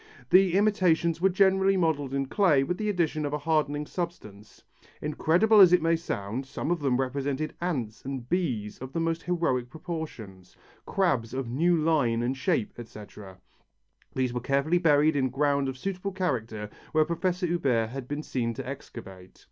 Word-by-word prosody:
The 185 -1 +5
imitations 180 -5 +2
were 190 - +4
generally 190 +1 +3
modelled 155 -6 0
in 135 0 -1
clay 150 -3 +3
with 180 +6 -3
the 210 -1 -1
addition 165 -5 0
of 145 0 -3
a - - +1
hardening 150 -1 0
substance. 130 - -7 0.4
Incredible 175 +8 +3
as 180 -3 +8
it 180 - +5
may 165 0 +3
sound, 130 -5 -4
some 140 +3 -4
of 175 - +1
them 135 -3 0
represented 140 +3 -2
ants 130 -12 -3
and 130 -3 -5
bees 125 - -2
of 130 +1 -8
the - - -1
most 165 0 -1
heroic 165 -9 -1
proportions, 150 - -8 0.3
crabs 130 - 0
of 130 -3 -3
new 170 +7 +2
line 145 -8 +1
and 125 +2 -1
shape, 130 -4 -1
etc. 105 -4 -11 0.8
These 130 -2 0
were 125 - -3
carefully 140 +7 +1
buried 150 -2 +4
in 130 -2 +1
ground 140 +1 +1
of 130 - -6
suitable 195 +4 -4
character 115 - -3 0.2
where 155 -1 +4
Prof. 175 +2 -1
Huber 145 -10 +1
had 125 +2 -7
been 145 +2 -4
seen 115 -5 -2
to 130 +1 -6
excavate. 95 -9 -10
145 Hz, 170 wpm, -27 LUFS, 125-175 Hz, 0.8 s, as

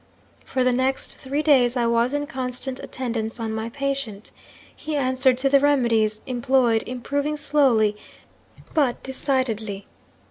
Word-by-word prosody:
'"For 260 -1 -1
the 255 - +3
next 260 +2 0
three 280 +3 -2
days 260 -5 +4
I 240 - +1
was 235 +1 +2
in 290 0 -1
constant 260 -2 -4
attendance 230 -3 -4
on 225 -1 -3
my 220 +1 -3
patient. 275 -5 -4 0.4
He 310 - -5
answered 260 -2 +2
to 265 +2 +1
the 275 0 +5
remedies 235 -7 +2
employed 245 -2 +2
improving 285 +4 -2
slowly, 255 -8 +3 0.8
but 280 -6 +1
decidedly. 230 -7 -2
255 Hz, 135 wpm, -23 LUFS, 230-275 Hz, 0.8 s, the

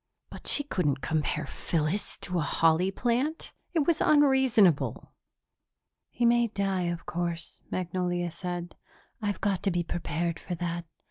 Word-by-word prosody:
But - - -9
she 290 - +1
couldn't 150 - 0
compare 155 +2 0
Phyllis 165 +5 -2
to 180 -1 -1
a - - +1
holly 165 +4 +3
plant! 250 +9 -1 0.2
It 310 -4 +3
was 330 -1 +2
unreasonable. 265 - +4 1.0
"He 240 - 0
may 235 0 +4
die, 195 -4 -1
of 170 -1 -3
course," 170 -1 -3
Magnolia 175 -1 -1
said. 175 0 -5 0.5
"I've 205 -2 -2
got 200 -3 +1
to 200 - +1
be 175 -1 0
prepared 170 0 -2
for 180 - -4
that. 170 0 -3
180 Hz, 140 wpm, -28 LUFS, 170-220 Hz, 1.0 s, unreasonable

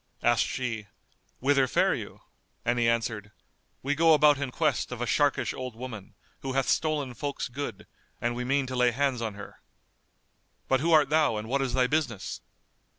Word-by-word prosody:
Asked 120 0 +3
she, 115 -5 -3 0.5
"Whither 135 0 +3
fare - - +2
you?"; - - -7 0.4
and 120 +1 +1
he 115 -1 +3
answered, 110 -3 -2 0.5
"We 140 +2 +1
go 160 +1 +5
about 150 -1 +5
in 140 -2 -2
quest 150 -1 0
of 125 - -5
a 120 - -1
sharkish 145 +3 +1
old 130 -3 -6
woman, 115 -5 -8 0.2
who 135 - -4
hath 135 -1 +1
stolen 150 -5 0
folk's 140 +4 -4
good, 140 +3 -6 0.3
and 120 0 -1
we 125 - -3
mean 135 +2 +1
to 130 0 -5
lay 125 0 +4
hands 130 0 0
on 110 -3 -3
her. 105 -1 -11 1.1
But 130 - +3
who 165 +5 +1
art 150 -4 +5
thou 155 -6 +3
and 105 +1 -5
what 135 +3 0
is 130 -2 -1
thy 130 -1 +4
business?" 125 -9 -2
130 Hz, 185 wpm, -28 LUFS, 120-145 Hz, 1.1 s, go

